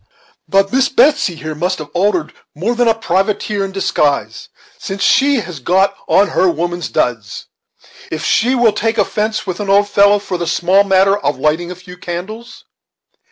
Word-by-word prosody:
But 195 +1 +1
Miss 265 0 +2
Betsey 280 - +2
here 155 0 -6
must 180 +5 -2
have 150 -2 -9
altered 180 -3 0 0.2
more 195 +10 -1
than 240 0 +1
a 225 - +3
privateer 205 0 -1
in 195 - -4
disguise, 145 - -1 0.3
since 195 0 -5
she 275 -2 +3
has 175 -6 -8
got 190 +8 +1
on 200 +1 +3
her 185 - +2
woman's 175 +1 -3
duds, 115 -4 -2 0.6
if 160 - -5
she 250 +4 +2
will 235 -4 +3
take 225 +2 -1
offence 215 +1 -1
with 185 0 -5
an 205 -1 -4
old 200 +1 +4
fellow 205 0 +4
for 190 -3 -5
the 170 - -3
small 185 +4 +2
matter 195 0 +3
of 145 -9 -2
lighting 155 +5 -1
a 180 - -6
few 180 0 -13
candles." 195 +8 -8
195 Hz, 175 wpm, -16 LUFS, 175-210 Hz, 0.6 s, old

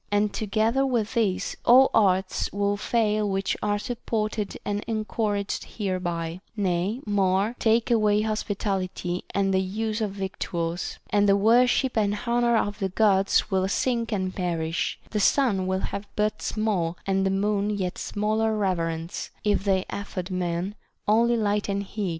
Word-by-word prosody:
And 205 0 +2
together 220 +5 +1
with 240 -5 0
this, 215 -6 0
all 260 +3 +7
arts 190 -3 +2
would 200 0 0
fail 215 -2 +1
which 195 0 0
are 205 0 +1
supported 215 -2 -3
and 205 0 -2
en 215 -2 -2
couraged 205 -3 -2
hereby; 175 -4 -2 0.2
nay, 195 +4 0
more, 200 +2 +1
take 225 +1 +2
away 210 -2 +3
hospitality 195 -4 -2
and 195 -1 +2
the 190 - +3
use 215 +3 -2
of 215 - 0
victuals, 185 -3 -3
and 205 -1 +3
the 200 - +6
worship 245 +4 +3
and 210 -2 +1
honor 235 0 +2
of 205 -1 -1
the 195 - -1
Gods 195 0 +2
will 190 0 +2
sink 235 +3 0
and 185 -3 -1
perish; 165 -3 -2
the 215 - 0
sun 205 -5 +2
will 190 0 0
have 200 +1 -4
but 210 0 0
small 190 -6 -1
and 195 0 +1
the 195 - +2
moon 200 +1 0
yet 190 -4 -2
smaller 215 +1 0
reverence, 165 -4 -2
if 205 -2 +1
they 190 -1 +2
afford 190 -2 -5
men 180 +1 -2 0.3
only 235 +3 +4
light 210 -1 0
and 200 0 -1
heat. 200 -1 -3
205 Hz, 155 wpm, -25 LUFS, 190-215 Hz, 0.3 s, all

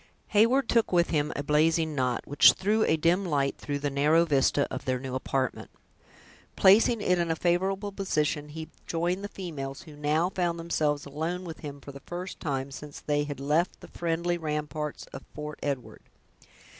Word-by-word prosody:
Heyward 230 +5 +4
took 230 -2 +2
with 175 -1 +3
him 150 -1 +1
a 145 - -2
blazing 160 +2 +2
knot, 125 -3 0
which 145 - +7
threw 215 +3 +1
a 160 - +2
dim 170 +5 +2
light 140 -6 0
through 145 -1 -3
the 145 0 -2
narrow 150 +4 +4
vista 140 -2 +2
of - - -5
their 130 -1 0
new 130 0 -6
apartment. 130 0 -2 0.9
Placing 210 +3 +5
it 180 -3 +2
in 170 -1 0
a 165 - +1
favorable 190 +4 0
position, 150 -6 -1
he 160 +1 -7 0.2
joined 175 +3 -1
the - - -2
females, 150 -7 -6
who 155 -4 -12
now 155 +5 +1
found 175 -3 -1
themselves 155 -3 -1
alone 160 +6 -3
with 165 -3 -8
him 145 -2 -7
for 140 - -10
the 140 - -10
first 180 +5 -7
time 135 -2 -3
since 145 +1 -9
they 145 0 0
had 145 -2 -6
left 150 +6 0
the - - -12
friendly 170 +1 -1
ramparts 150 -1 -3
of 135 - -7
Fort 150 0 -6
Edward. 140 -4 -4
155 Hz, 180 wpm, -28 LUFS, 145-175 Hz, 0.9 s, which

